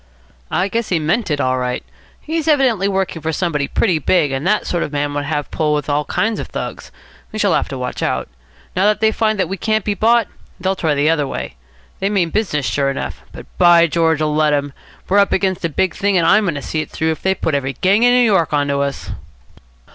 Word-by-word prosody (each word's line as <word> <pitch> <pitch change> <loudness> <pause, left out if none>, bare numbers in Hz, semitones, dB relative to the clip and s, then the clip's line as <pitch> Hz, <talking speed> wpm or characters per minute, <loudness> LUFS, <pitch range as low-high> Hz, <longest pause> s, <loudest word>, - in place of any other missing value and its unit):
"I 180 +3 0
guess 230 +2 -2
he 180 - +2
meant 175 +8 0
it 145 -2 0
all 130 -2 +1
right. 125 0 -2 0.4
He's 320 +1 -3
evidently 260 - +3
working 190 -4 -2
for 160 - -2
somebody 155 -4 -1
pretty 180 -8 +1
big, 155 -1 +2
and 135 +5 -2
that 210 +1 +1
sort 175 - -1
of - - -3
man 145 0 -2
would 145 0 -2
have 145 -1 -2
a - - -31
pull 150 -1 0
with 150 0 -3
all 145 +1 0
kinds 220 0 -1
of - - -5
Thugs. - - -6 0.4
We 215 - -6
shall 205 -4 +2
have - - 0
to 135 - -5
watch 125 0 -4
out. - - -1 0.5
Now 185 - +2
that 210 0 +2
they 220 0 +3
find 215 -1 0
we 195 +3 -4
can't 215 +2 0
be 210 - +1
bought, 225 +1 +3 0.3
they'll 190 +2 0
try 160 -5 0
the 145 +3 +3
other 150 -4 0
way. 135 - -5 0.5
They 195 - 0
mean 185 -5 0
business 165 -10 -1
sure 140 +1 0
enough. 135 - -5
But, - - -10
by 175 -1 +6
George, 160 -1 +1
let 155 0 +2
'em! 145 -1 -1 0.3
We're 200 +2 +3
up 200 - +3
against 190 -2 0
a - - 0
big 175 +4 0
thing, 200 -2 +1
and 170 - +2
I'm 205 +5 +4
going 170 -5 -1
to 145 - -5
see 155 - -2
it - - -7
through 160 0 -1
if 160 - -5
they 190 0 +1
put 160 - -2
every 140 -1 -1
gang 195 +6 +2
in 245 0 +5
New 245 0 +4
York 190 -8 +2
on 145 -1 +1
to 140 0 0
us." 140 0 -3
170 Hz, 245 wpm, -18 LUFS, 145-200 Hz, 0.5 s, by